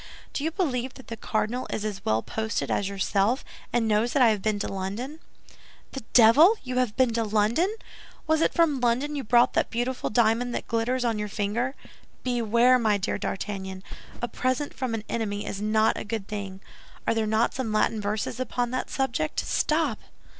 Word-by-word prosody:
"Do 280 - -2
you 320 - +1
believe 265 -8 -2
that 260 - -13
the 230 - -4
cardinal 220 +3 -2
is 215 - -3
as 200 -2 -4
well 110 +1 +1
posted 220 0 -2
as 200 - 0
yourself, 200 +5 0 0.3
and 235 -2 +1
knows 220 +3 +2
that 280 - +3
I 235 - +7
have 210 -3 0
been 215 0 0
to 205 - -2
London?" 205 +11 -4 0.7
"The 270 - -6
devil! 275 - +8
You 255 -1 -4
have 240 -4 0
been 255 -3 +3
to 230 0 +1
London! 220 - +1 0.5
Was 315 0 +2
it - - +3
from 315 -5 +3
London 250 +5 +1
you 280 - -3
brought 240 +2 +4
that - - +1
beautiful 245 +2 -2
diamond 235 +2 +2
that - - -3
glitters 245 +2 0
on 225 -3 0
your 210 - -2
finger? 220 +6 -2 0.5
Beware, 245 +1 +3
my 215 -3 +2
dear 195 - -2
D'Artagnan! 190 -1 -4 0.4
A - - +1
present 255 +4 -1
from 255 -3 -2
an 215 - -5
enemy 205 -3 -2
is 200 - -5
not 215 +1 +2
a - - -4
good 210 -2 -4
thing. 195 -2 -6 0.4
Are - - +2
there 225 -1 0
not 220 +2 +2
some 255 -4 -3
Latin 215 0 +1
verses 210 +3 -2
upon 245 -1 -1
that 255 - -2
subject? 235 - -1
Stop!" 305 -7 0
230 Hz, 190 wpm, -26 LUFS, 210-255 Hz, 0.7 s, devil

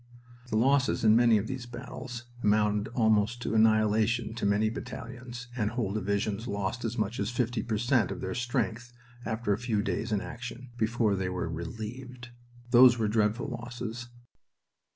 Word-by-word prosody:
The 110 - -1
losses 135 +3 +3
in 110 -1 +6
many 115 -1 +5
of 105 - -1
these 125 0 -5
battles 120 0 -7 0.2
amounted 105 0 +2
almost 110 0 +2
to - - -2
annihilation 110 +1 +3
to 115 -3 -1
many 105 +2 +2
battalions, 120 +1 -7
and 110 -4 0
whole 110 -4 -2
divisions 100 +2 -1
lost 100 +4 -2
as 115 +1 -3
much 110 +3 -1
as - - 0
50 120 -1 -1
per 110 0 -2
cent 120 +2 +2
of - - -5
their 95 0 -3
strength 120 -1 -2 0.3
after 110 -2 0
a 100 - -2
few 115 -4 0
days 110 +2 -2
in 105 - +2
action, 125 +3 -8
before 110 -2 +1
they 95 -1 -2
were 90 -2 -2
"relieved." 115 +9 -6 0.4
Those 125 -1 +8
were 110 -2 +1
dreadful 110 +4 +1
losses. 120 -1 -6
115 Hz, 165 wpm, -29 LUFS, 105-120 Hz, 0.4 s, Those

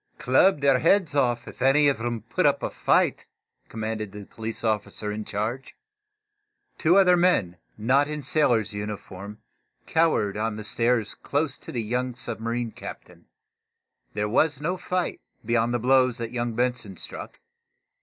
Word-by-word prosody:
"Club 150 +4 +3
their 135 -2 +4
heads 170 +1 +3
off, 120 -4 +1
if - - -11
any 135 +3 +5
of 135 -5 +1
'em 120 -2 -3
put 115 - +1
up - - +1
a - - -2
fight," - - +1 0.4
commanded 110 -2 -4
the 105 0 -9
police 115 +2 -6
officer 105 -1 -2
in 105 +1 -4
charge. 115 +7 -4 1.0
Two 170 +4 +4
other 180 -2 +6
men, 170 - +2 0.2
not 135 +6 +3
in 150 -1 -4
sailors' 120 -7 +2
uniform 105 -1 -7 0.5
cowered 160 -12 +2
on 110 0 -1
the 110 - -6
stairs, 115 0 +1
close 145 -1 -2
to - - -9
the 120 -3 -2
young 125 +3 -2
submarine 115 0 -3
captain. - - -11 0.9
There 105 0 0
was 145 +6 +2
no 170 +5 -1
fight, 180 0 -2 0.2
beyond 115 +1 +1
the 120 - +1
blows 130 0 +3
that 115 -2 -5
young 120 -2 -2
Benson 120 -6 -1
struck. - - -7
120 Hz, 155 wpm, -25 LUFS, 110-140 Hz, 1.0 s, other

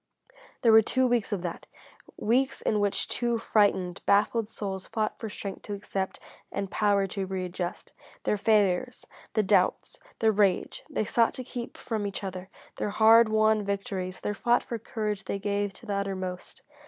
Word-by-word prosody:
There 230 - +6
were 220 0 +9
two 260 +4 +1
weeks 240 -4 +1
of 195 -4 -2
that: 175 -2 -5 0.5
weeks 260 +5 +1
in 210 - +1
which 205 -1 0
two 235 -1 0
frightened, 200 -5 +1
baffled 210 +2 +3
souls 195 -4 -5
fought 215 -1 -2
for 220 - -5
strength 200 -1 -6
to 205 - -2
accept 195 -1 -4 0.3
and 195 -1 -3
power 205 -2 +2
to 195 0 -4
readjust. 180 -2 -4 0.3
Their - - +1
failures, 210 +3 +1 0.3
the 215 - +3
doubts, 190 -2 +1 0.2
the 220 -1 +3
rage, 200 -3 +1
they 215 - -1
sought 230 +2 +2
to 255 - -5
keep 245 -1 -7
from 220 -4 -3
each 200 0 -5
other; 190 -1 -6 0.3
their - - -1
hard 220 +2 +6
won 215 0 +3
victories, 195 -2 -3
their 210 - -1
fought 240 +4 +2
for 235 - -5
courage 215 -2 -3
they - - -2
gave 205 0 -1
to - - -15
the 205 - -3
uttermost. 190 -2 -4
205 Hz, 170 wpm, -28 LUFS, 195-225 Hz, 0.5 s, were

